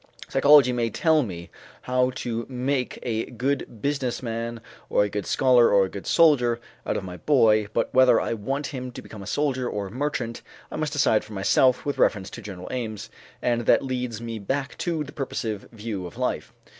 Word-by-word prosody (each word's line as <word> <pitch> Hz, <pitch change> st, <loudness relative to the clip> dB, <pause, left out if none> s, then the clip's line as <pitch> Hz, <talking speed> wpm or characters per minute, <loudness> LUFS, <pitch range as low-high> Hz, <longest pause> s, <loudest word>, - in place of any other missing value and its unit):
Psychology 135 Hz, -1 st, +6 dB
may 120 Hz, -1 st, 0 dB
tell 160 Hz, +6 st, +3 dB
me 85 Hz, -8 st, -6 dB, 0.3 s
how 125 Hz, 0 st, +2 dB
to 115 Hz, -2 st, -3 dB
make 130 Hz, 0 st, -1 dB
a 110 Hz, -2 st, -1 dB
good 125 Hz, -2 st, -3 dB
business 140 Hz, -4 st, -1 dB
man 115 Hz, 0 st, -4 dB, 0.3 s
or -, -, +3 dB
a 105 Hz, -, -1 dB
good 105 Hz, 0 st, -4 dB
scholar 125 Hz, -3 st, +5 dB
or 100 Hz, -1 st, +5 dB
a -, -, -6 dB
good 100 Hz, -, -8 dB
soldier 125 Hz, -8 st, +4 dB, 0.3 s
out -, -, 0 dB
of -, -, -4 dB
my 90 Hz, -1 st, -7 dB
boy, 110 Hz, -, +3 dB
but 115 Hz, -, -1 dB
whether 130 Hz, -2 st, +6 dB
I -, -, -1 dB
want 135 Hz, +7 st, -3 dB
him 130 Hz, -1 st, -5 dB
to -, -, -8 dB
become 105 Hz, -, -10 dB
a 100 Hz, -, -9 dB
soldier 130 Hz, -2 st, 0 dB
or 105 Hz, -1 st, -3 dB
a 95 Hz, -, -8 dB
merchant 125 Hz, -2 st, -3 dB, 0.3 s
I -, -, -5 dB
must 155 Hz, -1 st, -2 dB
decide 120 Hz, -7 st, +3 dB
for 110 Hz, -, -11 dB
myself 125 Hz, +6 st, +3 dB
with 145 Hz, -, -2 dB
reference 100 Hz, -3 st, +2 dB
to 120 Hz, -, -8 dB
general 95 Hz, -4 st, -8 dB
aims, 110 Hz, -4 st, -5 dB, 0.3 s
and 120 Hz, -1 st, 0 dB
that -, -, +4 dB
leads 125 Hz, -3 st, -3 dB
me 115 Hz, -1 st, -5 dB
back 135 Hz, +7 st, -3 dB
to 165 Hz, -3 st, -1 dB
the 140 Hz, -, -10 dB
purposive 110 Hz, -7 st, -4 dB
view 105 Hz, -5 st, -5 dB
of -, -, -13 dB
life. -, -, -2 dB
120 Hz, 200 wpm, -25 LUFS, 110-135 Hz, 0.3 s, Psychology